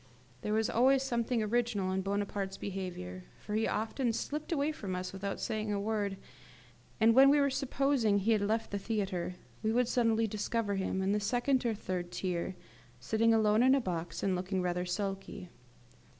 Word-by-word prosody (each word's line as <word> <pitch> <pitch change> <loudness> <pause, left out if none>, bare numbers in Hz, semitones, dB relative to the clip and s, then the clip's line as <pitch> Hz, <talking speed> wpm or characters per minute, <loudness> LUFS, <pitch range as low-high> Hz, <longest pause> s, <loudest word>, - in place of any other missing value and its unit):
There 210 - -2
was 220 0 +2
always 260 +3 +4
something 235 -2 0
original 215 -4 0
in 190 0 0
Bonaparte's 200 0 -2
behaviour, 175 - -5
for 210 - -7
he 220 +1 +1
often 225 +3 -1
slipped 295 +8 -4
away 295 -1 +1
from 195 -11 -5
us 180 +1 -4
without 195 0 -4
saying 215 -1 -2
a 200 - 0
word; 205 -2 -1 0.8
and 225 +1 +6
when 270 +3 +8
we 290 +1 +5
were 280 -1 +3
supposing 270 -5 +1
he 200 +3 +1
had 215 -2 +3
left 220 +2 0
the 200 - -2
theatre, 195 -4 -2 0.3
we 220 - +1
would 245 +1 +2
suddenly 230 -2 +2
discover 215 0 -1
him 190 -1 -1
in 195 - +1
the 210 - +2
second 250 +5 +1
or 225 - 0
third 180 -3 -4
tier, 180 0 -2 0.4
sitting 220 - +2
alone 215 0 +4
in 260 +2 +6
a - - +3
box, 175 -7 -4
and 190 -2 +2
looking 185 +1 -2
rather 180 0 -1
sulky. 195 0 -4
210 Hz, 180 wpm, -32 LUFS, 190-235 Hz, 0.8 s, when